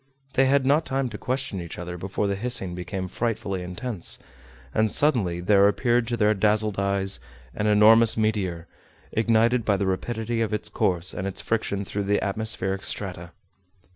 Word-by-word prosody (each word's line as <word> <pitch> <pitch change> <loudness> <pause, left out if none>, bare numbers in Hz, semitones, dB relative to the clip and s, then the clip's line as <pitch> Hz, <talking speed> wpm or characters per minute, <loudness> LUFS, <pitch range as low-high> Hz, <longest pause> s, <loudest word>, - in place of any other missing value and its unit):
They 135 0 +3
had 140 0 +3
not 145 +4 +3
time 135 -3 -1
to 110 - -7
question 130 -6 -2
each 85 -1 -8
other 90 0 -6
before 95 +3 -3
the 100 0 0
hissing 100 -4 -2
became 90 +1 -4
frightfully 100 -2 -2
intense, 90 +2 -3 0.6
and 110 0 +2
suddenly 110 - +2
there 100 +2 +5
appeared 120 +3 +1
to 120 0 -1
their 105 -1 +3
dazzled 105 0 +1
eyes 100 0 0 0.3
an 105 - -1
enormous 110 +2 +6
meteor, 100 -6 -1 0.5
ignited 115 +2 +2
by 100 -2 +2
the 100 - -1
rapidity 115 +4 -2
of 110 -1 0
its 105 - -3
course 90 -1 0
and 95 - -3
its 95 - -4
friction 100 -3 -2
through 100 +1 -3
the 100 +1 +2
atmospheric 100 -2 -1
strata. 90 -4 -3
105 Hz, 170 wpm, -25 LUFS, 95-115 Hz, 0.6 s, enormous